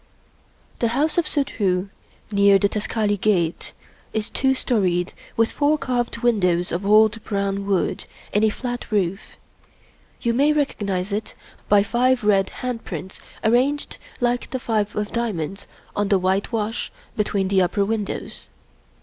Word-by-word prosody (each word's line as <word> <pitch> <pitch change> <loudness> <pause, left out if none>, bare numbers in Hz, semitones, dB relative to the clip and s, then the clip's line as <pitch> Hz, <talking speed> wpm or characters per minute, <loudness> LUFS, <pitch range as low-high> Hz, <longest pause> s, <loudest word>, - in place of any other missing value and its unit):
The 235 - +2
house 310 +4 +2
of 330 - 0
Suddhoo, 200 -10 0 0.4
near 200 -1 +5
the 200 - +2
Taksali 210 0 -1
Gate, 175 -6 +1 0.4
is 220 0 -2
two 265 0 +2
storied, 185 -8 +1 0.2
with 230 0 +3
four 295 +1 +2
carved 240 -3 -2
windows 180 -7 +2
of 185 +4 -2
old 215 +1 +5
brown 200 -1 -2
wood, 195 -2 0 0.3
and 210 - +3
a 220 - +5
flat 245 +2 -5
roof. 195 -2 -1 0.8
You 235 - 0
may 285 +5 +4
recognize 200 -10 -1
it 210 +2 -3 0.3
by 205 -1 +6
five 250 +2 +2
red 195 -2 +3 0.2
hand 245 -2 -3
prints 190 - -7 0.2
arranged 255 +6 +1 0.2
like 245 -1 0
the 260 - -3
Five 215 -4 -1
of 210 0 -2
Diamonds 195 -5 -3 0.3
on 205 0 +1
the 195 - +4
white 190 +2 0
wash 225 0 -2 0.2
between 200 -2 0
the 195 -1 +4
upper 200 +3 +1
windows. 215 -1 -4
210 Hz, 145 wpm, -22 LUFS, 195-240 Hz, 0.8 s, by